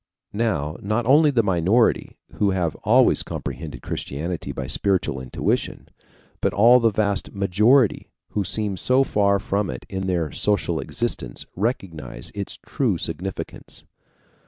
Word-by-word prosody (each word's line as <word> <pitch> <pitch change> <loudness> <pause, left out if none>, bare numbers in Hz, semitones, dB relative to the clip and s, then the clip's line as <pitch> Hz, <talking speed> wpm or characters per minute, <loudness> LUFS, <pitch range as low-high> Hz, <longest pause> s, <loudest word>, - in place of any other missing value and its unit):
Now 85 -9 -1
not 110 +4 -1
only 150 +5 +6
the 125 -5 +2
minority, 95 +5 +2
who 105 - +1
have 90 -4 0
always - - +4
comprehended 75 -1 -6
Christianity 80 +5 -4
by - - -5
spiritual 90 -9 0
intuition, 65 - -2 0.5
but - - 0
all 120 +5 +7
the 115 -1 +4
vast 100 -2 0
majority 105 +6 +3 0.2
who 105 - -1
seem 105 0 -2
so 130 +9 +3
far 100 -5 +2
from 100 +1 -1
it 65 - -6
in 95 0 -3
their 85 -5 0
social 105 -1 0
existence - - -3
recognize 85 - -3
its - - -5
true - - 0
significance. 95 +2 -6
100 Hz, 135 wpm, -23 LUFS, 85-110 Hz, 0.5 s, all